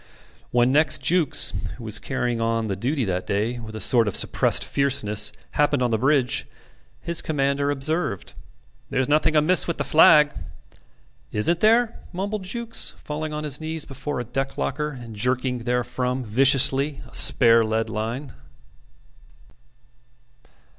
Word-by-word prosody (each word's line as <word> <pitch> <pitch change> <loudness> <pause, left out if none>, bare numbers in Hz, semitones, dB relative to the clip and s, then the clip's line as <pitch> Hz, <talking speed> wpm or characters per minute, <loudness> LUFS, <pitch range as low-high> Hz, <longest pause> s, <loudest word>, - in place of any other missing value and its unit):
When 120 +1 +2
next 150 +3 +2
Jukes, 175 -4 +2 0.2
who 120 - -11
was 105 -1 -2
carrying 120 -3 -3
on 115 0 -1
the 100 -3 -3
duty 125 +6 -2
that 90 -1 -3
day 110 +5 -2
with 110 -1 -10
a - - -6
sort 115 0 +4
of 100 - -3
suppressed - - +2
fierceness, 135 -7 +1 0.2
happened 145 -3 +1
on 120 - 0
the 110 - +1
bridge, 135 -1 +1 0.5
his 170 0 -2
commander 140 -1 -1
observed: 145 - -3 0.6
"There's 130 -1 -1
nothing 155 +2 +1
amiss 155 +5 +3
with 170 - -3
that - - -2
flag." 150 -1 +5 1.0
"Isn't 165 +11 0
there?" 230 +2 +2
mumbled 195 +2 -5
Jukes, 230 +4 -3
falling 155 +1 -6
on 150 0 -5
his 145 0 -3
knees 160 0 -4
before 135 0 -6
a - - -3
deck 135 +3 -5
locker 150 +2 -2
and 120 -6 -10
jerking 125 +1 -2
therefrom 125 +1 -2
viciously 135 +4 +3
a - - -19
spare 115 -2 +6
lead 110 0 -2
line. 115 +5 -5
135 Hz, 145 wpm, -22 LUFS, 120-150 Hz, 1.0 s, spare